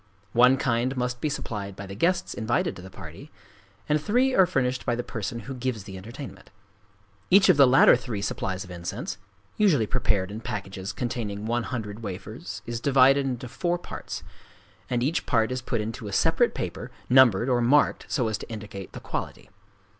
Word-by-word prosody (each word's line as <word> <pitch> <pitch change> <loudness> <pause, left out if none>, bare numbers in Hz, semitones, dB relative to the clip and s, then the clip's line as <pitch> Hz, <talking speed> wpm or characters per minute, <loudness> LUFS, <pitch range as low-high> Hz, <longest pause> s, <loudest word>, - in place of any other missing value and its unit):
One 125 +3 +6
kind 125 +1 0
must 125 0 -2
be 155 - 0
supplied 100 -8 -5
by 100 - -7
the 100 - -8
guests 170 - 0
invited 110 +1 0
to - - -10
the 95 - -10
party; - - -11 0.6
and 150 0 +2
three 250 - +2
are 190 -6 +5
furnished 130 -6 0
by 120 - 0
the 120 - -3
person 115 +1 -4
who 135 - -7
gives 125 -4 -3
the 95 -1 -9
entertainment. 115 +9 -9 0.8
Each 190 +1 +6
of 180 - +6
the 140 -2 +8
latter 130 +2 +7
three 120 -5 -4
supplies 95 -2 -2
of 95 - -12
incense—usually 100 - -2
prepared 105 -5 0
in 105 - -5
packages 100 -4 -5
containing 110 -4 -4
one 120 +2 0
hundred 110 -3 -5
wafers 105 - -7
is 115 -1 -4
divided 135 +1 +5
into 125 -1 -3
four 175 +9 -1
parts; 175 - -7 0.7
and 120 -1 0
each 150 +6 -1
part 110 +1 +2
is 130 0 -2
put 120 -2 -2
into 110 0 -5
a - - -5
separate - - +2
paper - - -4 0.2
numbered 125 -4 +5
or 125 -2 +2
marked 140 +5 +3
so 125 -4 +1
as 110 - -2
to - - -9
indicate 105 -4 -8
the - - -7
quality. - - -6
120 Hz, 185 wpm, -26 LUFS, 105-130 Hz, 0.8 s, the